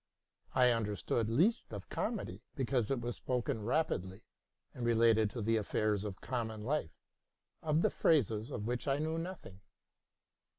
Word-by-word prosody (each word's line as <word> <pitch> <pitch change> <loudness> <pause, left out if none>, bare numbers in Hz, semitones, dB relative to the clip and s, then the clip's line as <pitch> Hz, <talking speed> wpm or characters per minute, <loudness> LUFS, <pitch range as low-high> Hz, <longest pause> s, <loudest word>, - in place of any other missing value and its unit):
I 125 -1 +6
understood 110 0 0
least 180 - +2
of 100 -3 -7
comedy; - - -3
because 125 -4 0
it 135 - +1
was 120 0 -4
spoken 125 -1 -1
rapidly, 105 - -1 0.5
and 125 - -6
related 115 -2 +4
to 115 +1 -5
the 115 +1 +2
affairs 105 -1 0
of 100 -2 -6
common 110 -4 -3
life, 125 - -1 0.6
of 155 +1 +2
the - - +3
phrases 115 - +2
of 105 -7 -4
which 125 +4 -2
I 135 0 +2
knew 160 +2 -1
nothing. 165 - -7
115 Hz, 145 wpm, -34 LUFS, 105-135 Hz, 0.6 s, I